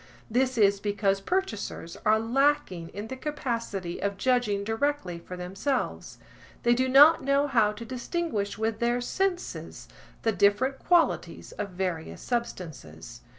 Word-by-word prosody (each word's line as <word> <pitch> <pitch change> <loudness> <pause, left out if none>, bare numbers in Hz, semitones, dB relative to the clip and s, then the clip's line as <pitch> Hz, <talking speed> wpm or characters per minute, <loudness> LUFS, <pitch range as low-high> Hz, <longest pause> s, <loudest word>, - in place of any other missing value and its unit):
This 255 +1 +1
is 200 -2 +4
because 200 -1 0
purchasers 220 - -3
are 215 0 +6
lacking 225 - +1
in 205 +1 -6
the 260 - -6
capacity 230 - -4
of 200 0 -1
judging 220 -3 +1
directly 225 -5 -1
for 180 +2 -9
themselves. 195 +10 -3 0.5
They 240 - +5
do 260 +2 +1
not 290 +5 +7
know 275 +1 +3
how 230 -7 +3
to 220 +2 -8
distinguish 245 - -3
with 220 0 -1
their 240 +1 +1
senses 360 +8 -3 0.4
the 225 - +3
different 210 +7 +2
qualities 345 -2 +1
of 205 -1 -5
various 180 -3 -4
substances. 140 - -5
225 Hz, 135 wpm, -27 LUFS, 195-265 Hz, 0.5 s, not